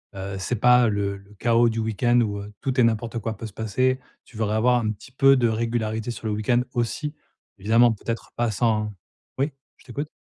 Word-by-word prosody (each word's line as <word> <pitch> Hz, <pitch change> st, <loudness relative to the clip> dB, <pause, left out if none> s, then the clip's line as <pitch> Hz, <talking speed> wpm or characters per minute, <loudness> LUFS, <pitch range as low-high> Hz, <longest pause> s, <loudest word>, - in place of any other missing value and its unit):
"Heu, 95 Hz, 0 st, -5 dB
c'est 110 Hz, +6 st, -2 dB
pas, 125 Hz, +2 st, +5 dB
heu, -, -, +2 dB
le 100 Hz, -1 st, -1 dB
le 100 Hz, +1 st, -18 dB
chaos 115 Hz, +2 st, +3 dB
du 115 Hz, 0 st, -2 dB
week-end 115 Hz, +2 st, +2 dB
où, 100 Hz, -3 st, -1 dB
heu, 100 Hz, +1 st, -8 dB
tout 130 Hz, -2 st, -1 dB
et -, -, +6 dB
n'importe 115 Hz, 0 st, 0 dB
quoi 110 Hz, -1 st, -4 dB
peut 115 Hz, -, -7 dB
se 110 Hz, -, -8 dB
passer"». 130 Hz, +5 st, 0 dB, 0.3 s
Tu -, -, -19 dB
voudrais 110 Hz, -1 st, 0 dB
avoir 125 Hz, +3 st, +3 dB
un 110 Hz, -2 st, -1 dB
petit 110 Hz, +4 st, -11 dB
peu 135 Hz, +1 st, +5 dB
de 125 Hz, -3 st, +3 dB
régularité 110 Hz, 0 st, -1 dB
sur 115 Hz, -, -9 dB
le 105 Hz, -, 0 dB
week-end 115 Hz, +4 st, +1 dB
aussi, 125 Hz, +5 st, -2 dB, 0.5 s
évidemment, 115 Hz, +4 st, +4 dB
peut-être 115 Hz, +1 st, -5 dB
pas 120 Hz, -1 st, +1 dB
sans 105 Hz, -1 st, +1 dB, 0.5 s
oui, 140 Hz, +3 st, 0 dB, 0.3 s
je -, -, -23 dB
t'écoute. 140 Hz, +4 st, -5 dB
115 Hz, 215 wpm, -24 LUFS, 105-120 Hz, 0.5 s, et